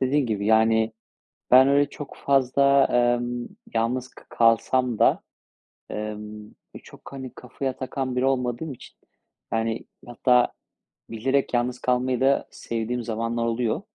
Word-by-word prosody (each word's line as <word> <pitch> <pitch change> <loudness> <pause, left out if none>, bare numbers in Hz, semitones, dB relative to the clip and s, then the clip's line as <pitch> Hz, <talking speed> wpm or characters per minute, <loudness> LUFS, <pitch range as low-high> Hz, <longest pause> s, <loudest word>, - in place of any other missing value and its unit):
dediğin 135 +1 +1
gibi, 105 -3 -2
yani, 110 0 +3 0.6
ben 130 +1 +8
öyle 140 0 +3
çok 145 0 -9
fazla, 140 0 +3
emm, 120 0 +1 0.3
yalnız 120 +3 -1
k - - -17
kalsam 115 +1 +2
da, - - +4 0.7
emm, 105 0 -6 0.3
e, - - -9
çok, - - -14
hani, 130 -2 -7
kafaya 130 +1 -5
takan 130 -1 -3
biri 125 +1 +1
olmadığım 130 +2 -1
için, - - -14 0.6
yani, 115 0 -1 0.2
hatta 125 +1 +2 0.6
bilerek 130 +5 0
yalnız 125 +1 0
kalmayı 125 0 0
da 135 +1 +2
sevdiğim 115 +1 -4
zamanlar 115 +1 -2
oluyor, 115 -1 -1
125 Hz, 130 wpm, -24 LUFS, 115-130 Hz, 0.7 s, ben